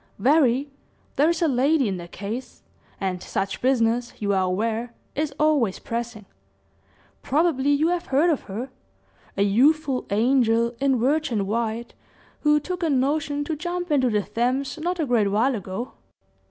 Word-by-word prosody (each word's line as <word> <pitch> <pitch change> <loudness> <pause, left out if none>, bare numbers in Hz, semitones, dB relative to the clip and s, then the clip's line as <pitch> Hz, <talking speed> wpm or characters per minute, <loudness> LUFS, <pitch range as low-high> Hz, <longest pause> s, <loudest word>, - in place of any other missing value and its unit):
"Very 275 +2 +3 0.4
there 295 +3 +4
is 340 0 0
a - - +4
lady 275 +1 +2
in 190 -2 -2
the 175 -1 -8
case; 210 +8 -7 0.4
and 185 -2 -2
such 195 0 -3
business, 240 -2 +1
you 205 -1 0
are 190 -1 +2
aware, 225 +5 -2 0.2
is 300 0 -1
always 295 -10 +2
pressing. 230 -3 -5 1.0
Probably 290 -2 +1
you 290 +3 +3
have 350 -1 -2
heard 295 +6 +3
of 295 - -2
her 235 +7 -5 0.7
a 200 - +3
youthful 265 +6 +2
angel, 235 +1 +2
in 270 -2 +2
virgin 255 -5 +1
white, 230 +2 -2 0.5
who 300 0 +3
took 360 +4 -5
a 330 - +1
notion 290 +2 0
to 315 +2 -3
jump 350 +2 -4
into 260 -4 +3
the 210 -2 +1
Thames, 260 +7 -1
not 355 +3 -2
a 315 - +1
great 235 -6 +2
while 225 +7 +2
ago." 205 +3 -5
255 Hz, 155 wpm, -24 LUFS, 225-300 Hz, 1.0 s, there